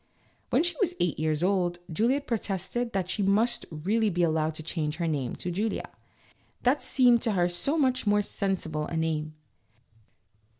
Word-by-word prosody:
When - - +3
she 350 - +2
was 355 -2 +1
eight 175 -4 0
years 155 0 0
old 180 -2 +1 0.2
Juliette 255 - +1
protested 220 +1 -2
that 190 -2 -1
she 205 - -1
must 215 +5 +2
really 205 +8 0
be 175 -2 0
allowed 160 -1 +1
to 155 - -7
change 155 -2 -2
her 170 +1 -2
name 140 -6 -2
to 180 - -4
Julia; 210 +5 -2 0.7
that 260 +4 +3
seemed 245 -3 +4
to 225 - 0
her 175 -2 +2
so 225 - 0
much 255 -6 +1
more 205 0 +3
sensible 170 -7 -2
a 165 - -3
name. 155 -1 -2
190 Hz, 170 wpm, -28 LUFS, 160-230 Hz, 0.7 s, seemed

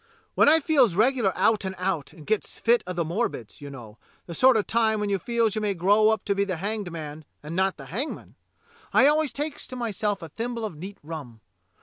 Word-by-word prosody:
When - - +5
I 320 +2 +6
feels 275 - +3
regular 230 -1 +3
out 220 -2 +3
and 190 0 -4
out, 180 -5 -2
and 155 -4 -14
gets 215 -1 -2
fits 235 +1 +3
of 180 - -4
the 170 -1 0
morbids, 165 - -3
you 145 - -7
know, 115 -6 -11 0.3
the 170 - -7
sort 255 +6 +5
of 210 - 0
time 220 -1 +1
when 205 -1 -1
you 195 - +1
feels 230 +1 0
you 215 - -2
may 205 -2 0
grow 205 +5 +4
up 220 -2 0
to 200 - +1
be 200 0 +1
the 190 -2 -2
hanged 200 0 -3
man 155 -1 -7 0.2
and 155 +3 -6
not 190 +1 +1
the 135 - -10
hangman, 230 - -5 0.6
I 265 - +6
always 300 0 +3
takes 295 +1 -5
to 255 - -7
myself 210 -5 -2
a 165 - -7
thimble 230 +5 -4
of 205 - -6
neat 190 +6 -8
rum. 145 -8 -8
200 Hz, 230 wpm, -26 LUFS, 170-230 Hz, 0.6 s, I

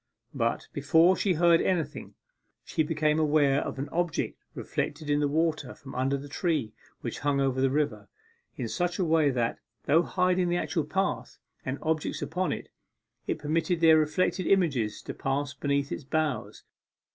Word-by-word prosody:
But, 115 -4 -1
before 160 +6 +4
she 190 -1 +1
heard 170 0 +4
anything, 180 -4 -2 0.5
she 160 - -1
became 155 0 +1
aware 145 -2 +3
of - - -5
an 135 +2 -3
object 170 -1 -1 0.2
reflected 150 0 -3
in 145 - +3
the 145 - +2
water 155 +1 0
from 135 - -11
under 135 +2 0
the 140 +1 -8
tree 145 - -1 0.3
which - - -5
hung 145 -1 +1
over 135 -1 +1
the 135 - +3
river 145 +2 -1 0.5
in - - -3
such 175 -1 -1
a 185 - +1
way 160 -2 +3
that, 120 -3 -1 0.2
though 160 +4 +4
hiding 180 0 +1
the 175 - +1
actual 165 -3 -1
path, 150 -8 -2 0.3
and 130 +1 -3
objects 155 -1 -1
upon 180 +3 -1
it, - - -5 0.6
it - - -1
permitted 165 +3 0
their 160 -1 +6
reflected 155 +4 0
images 140 - +1
to - - -6
pass 140 +1 -2
beneath 140 0 -1
its - - -4
boughs. 155 0 -2
155 Hz, 170 wpm, -28 LUFS, 140-170 Hz, 0.6 s, their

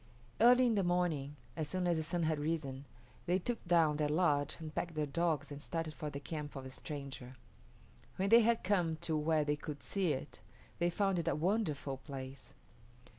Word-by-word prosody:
Early 250 +2 +7
in 235 - +3
the 200 -2 +2
morning, 175 -6 0 0.2
as 155 -2 -2
soon 185 +1 -1
as 175 -1 +3
the - - 0
sun 170 +2 -1
had 155 -1 +1
risen, 145 -3 -2 0.4
they 180 +2 +3
took 230 +6 -3
down 165 -4 +4
their 150 -1 +1
lodge 150 -3 +2
and 155 -1 -7
packed 170 0 -3
their 155 -1 0
dogs 155 -1 0
and 145 0 -7
started 165 -1 -3
for 155 -2 -5
the 140 - -5
camp 150 0 -6
of 135 - -5
the 130 - -8
stranger. 135 -3 -7 0.8
When 195 +1 0
they 230 +2 +8
had 230 0 +2
come 180 -4 +2
to 160 - -1
where 155 0 +2
they 145 0 +1
could 145 0 -7
see 185 -6 +1
it, 135 +2 -6 0.4
they 175 0 +3
found 195 0 +1
it 170 - -3
a - - +2
wonderful 155 -6 0
place. 135 -1 -9
160 Hz, 200 wpm, -35 LUFS, 145-175 Hz, 0.8 s, they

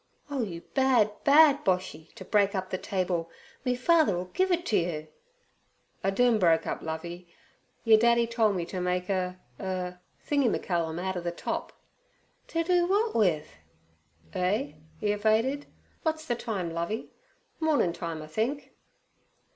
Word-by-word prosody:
'Oh, 275 -3 -1
you 175 -7 -4
bad, 255 -6 +4
bad 290 0 +6
Boshy, 180 -4 -1
t' - - -9
break 200 -1 +2
up 185 -1 -3
the 185 - -2
table! 180 -3 -1 0.3
Me 250 -1 +1
father 300 - +3
'll 180 +1 -5
give 375 0 +2
it 350 0 +1
to 215 - 0
you!' 155 -3 -2 1.0
'Iden 220 +4 +3
broke 165 -4 +3
up, - - -3
Lovey. 170 +2 -6 0.5
Yer 225 -2 +7
daddy 235 +1 +4
tole 230 -2 +2
me 180 -4 -2
ter 185 +1 -5
make 180 +1 -1
er—er—thingy 185 - -2
me - - +1
callum 170 -3 -2
outer 185 0 -2
ther 175 - -2
top.' 170 - -4 0.8
'To 330 0 -1
do 350 0 +3
w'at 420 +4 +1
with?' 170 - +1 0.8
'Eh?' 210 +10 0 0.3
he 210 - +1
evaded. 220 +7 +1 0.4
'Wot's 315 -1 -1
ther 240 - 0
time, 205 -8 -3
Lovey? 170 +7 -3 0.5
Mornin' 300 - +2
time, 165 -3 -5
I - - -10
think.' 230 - -2
195 Hz, 145 wpm, -28 LUFS, 175-250 Hz, 1.0 s, Yer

